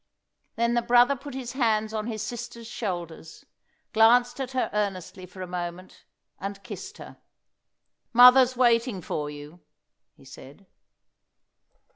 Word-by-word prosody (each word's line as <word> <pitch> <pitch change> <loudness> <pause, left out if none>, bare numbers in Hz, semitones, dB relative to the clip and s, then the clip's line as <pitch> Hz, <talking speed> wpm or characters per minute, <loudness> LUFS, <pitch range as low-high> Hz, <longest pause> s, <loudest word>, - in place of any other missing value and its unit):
Then 235 +1 +1
the 240 - +2
brother 245 +3 +4
put 275 +1 -10
his 250 -3 -5
hands 220 -4 0
on 215 0 -3
his 220 -2 -4
sister's 235 0 -7
shoulders, 175 -8 -6 0.5
glanced 245 +3 +4
at 260 0 -5
her 260 - -1
earnestly 195 -3 -3
for 185 +1 -9
a - - -4
moment, 180 +1 -7 0.3
and 195 +1 -6
kissed - - -9
her. - - -12 0.9
"Mother's 250 +1 +7
waiting 235 -5 +2
for 150 -1 -4
you," 150 +3 -11 0.6
he 135 - -20
said. 135 +7 -14
220 Hz, 130 wpm, -26 LUFS, 185-245 Hz, 0.9 s, Mother's